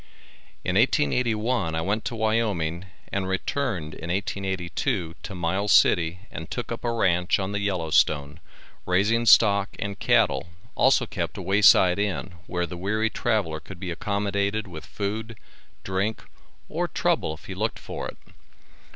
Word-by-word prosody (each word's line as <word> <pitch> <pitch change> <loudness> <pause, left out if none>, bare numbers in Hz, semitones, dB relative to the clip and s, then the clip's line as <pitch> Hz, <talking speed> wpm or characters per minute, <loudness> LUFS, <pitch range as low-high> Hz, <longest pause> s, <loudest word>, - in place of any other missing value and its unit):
In - - 0
1881 110 - +1
I 80 - 0
went 100 +6 -1
to 120 - -3
Wyoming 105 -7 0 0.3
and 100 -1 -1
returned 95 - -2
in 80 - -8
1882 95 -3 -2
to 95 - -7
Miles 95 +4 0
city 85 0 +4
and 80 - -7
took 120 - -4
up 115 - -5
a 120 - 0
ranch 90 -6 +2
on 95 0 -3
the 105 - -1
Yellow 90 -6 -2
Stone, 75 +1 +2 0.5
raising 105 +6 +2
stock 100 -3 +6
and 100 0 -4
cattle, 85 - +2 0.2
also - - +4
kept - - -4
a - - -5
way 95 +3 +2
side 95 -2 +6
inn, 95 -4 -2
where 90 -1 -1
the 85 +1 -7
weary 110 +4 0
traveler 105 -10 0
could 90 +3 -11
be 90 -1 -4
accommodated 100 +3 -1
with 85 -5 -10
food, 110 +2 -4 0.5
drink, 95 +4 -2 0.4
or - - -2
trouble 75 - 0
if 80 - -17
he 95 - -6
looked 110 +4 -2
for - - -6
it. - - -9
95 Hz, 155 wpm, -25 LUFS, 85-105 Hz, 0.5 s, stock